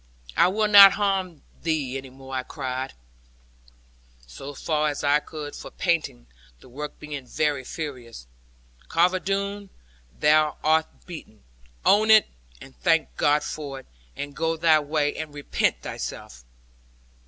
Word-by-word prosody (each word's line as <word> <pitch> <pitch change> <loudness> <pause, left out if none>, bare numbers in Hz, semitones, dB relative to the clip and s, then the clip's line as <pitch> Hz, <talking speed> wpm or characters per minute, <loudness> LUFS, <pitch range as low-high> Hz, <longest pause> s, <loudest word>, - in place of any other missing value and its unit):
'I - - +5
will 210 +3 +1
not 200 -2 +10
harm 195 -5 -1 0.2
thee 150 -5 -1
any 135 0 -6
more,' 135 +1 -12
I 130 - 0
cried, 130 -1 -5 1.3
so 135 - -9
far 155 +1 0
as 145 - -5
I 145 +1 +4
could 150 -1 -8
for - - -9
panting, 165 - -1 0.3
the - - -17
work 145 +4 -7
being 145 -3 -7
very 150 -2 -1
furious: 125 - -7 0.6
'Carver 180 +3 +2
Doone, 200 +1 -3 0.5
thou 155 0 +3
art 160 +1 +3 0.2
beaten: 155 - -11 0.4
own 215 +2 +4
it, 220 -1 +7 0.3
and 65 - -14
thank - - +1
God 145 - +2
for 140 -3 -6
it; - - -26 0.3
and 145 0 -6
go 165 0 -1
thy 160 -1 +5
way, 145 0 -1
and 155 -2 -6
repent 145 - -1
thyself.' - - -7
150 Hz, 140 wpm, -25 LUFS, 135-170 Hz, 1.3 s, not